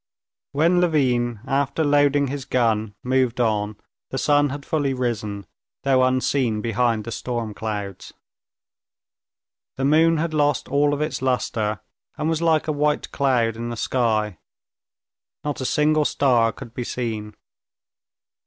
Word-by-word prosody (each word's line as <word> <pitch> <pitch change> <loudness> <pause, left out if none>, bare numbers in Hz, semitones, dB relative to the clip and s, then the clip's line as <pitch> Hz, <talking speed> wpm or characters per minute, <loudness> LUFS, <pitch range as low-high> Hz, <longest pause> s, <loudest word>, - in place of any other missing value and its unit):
When 170 +5 +3
Levin, 125 -9 +1
after 140 +3 0
loading 145 -1 +3
his 140 0 -4
gun, 110 -5 0
moved 125 -1 +1
on, 105 -3 0 0.3
the 135 - -4
sun 145 0 +3
had 140 +1 -6
fully 145 -4 0
risen, 110 -5 -3 0.4
though 130 -2 +3
unseen 130 -3 +1
behind 115 0 0
the 115 - -7
storm 115 0 -3
clouds. 105 -3 -5 1.7
The 135 - 0
moon 160 +3 +4
had 160 +1 -1
lost 145 -2 +1
all 145 +1 +2
of 145 - -4
its 155 -3 -2
luster, 115 -4 -1 0.4
and 150 +1 -1
was 160 0 0
like 160 -2 +2
a - - +1
white 150 0 0
cloud 120 -5 +1
in 120 +1 -5
the 120 - -5
sky. 110 -6 0 1.0
Not 145 -2 -3
a - - -2
single 150 +2 +2
star 120 -6 +3
could 115 - -11
be 125 - -4
seen. 110 -4 -4
130 Hz, 140 wpm, -23 LUFS, 115-145 Hz, 1.7 s, moon